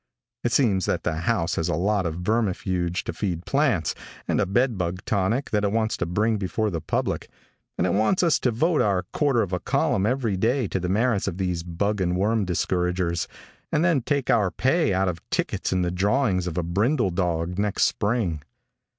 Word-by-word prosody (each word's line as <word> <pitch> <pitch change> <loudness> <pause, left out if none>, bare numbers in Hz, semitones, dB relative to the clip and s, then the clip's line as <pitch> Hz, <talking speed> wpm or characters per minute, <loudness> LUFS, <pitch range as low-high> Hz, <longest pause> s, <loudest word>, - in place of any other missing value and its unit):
It 120 - 0
seems 105 -9 +2
that - - 0
the - - 0
house 85 +1 0
has 80 +2 0
a 75 - +1
lot 95 +2 +1
of 85 +2 -5
vermifuge 95 -4 0
to - - -4
feed 90 -4 -3
plants, 135 - +1 0.3
and - - +1
a - - 0
bedbug 95 -5 0
tonic 110 +7 0
that 105 -1 +1
it 100 - +1
wants 110 0 0
to 85 - -2
bring 105 +5 +1
before 105 +2 -1
the 85 -3 -3
public, - - -2 0.5
and 85 - +1
it 95 - +1
wants 110 - +2
us 170 -3 +3
to 125 - +1
devote 155 +8 +2
a 95 -3 +1
quarter 135 -6 +2
of 95 -2 -5
a 90 - 0
column 95 +3 +1
every 120 -5 0
day 120 +4 +1
to 95 - -1
the 90 0 -3
merits 110 +1 +1
of 85 - -3
these 90 -3 -1
bug 95 +4 -2
and 90 -1 +1
worm 105 +2 +1
discouragers, 90 -1 0 0.4
and 155 +2 +2
then 165 -6 +3
take 140 +2 0
our 105 -5 +3
pay 145 - +1
out 95 0 +1
of 85 -2 -3
tickets - - -1
in 90 -1 +1
the 90 - -1
drawing 100 +2 +1
of 85 - -4
a 90 - +1
brindle 100 - +1
dog 85 0 -1
next 105 -1 +1
spring. 100 -8 0
100 Hz, 200 wpm, -24 LUFS, 90-115 Hz, 0.5 s, us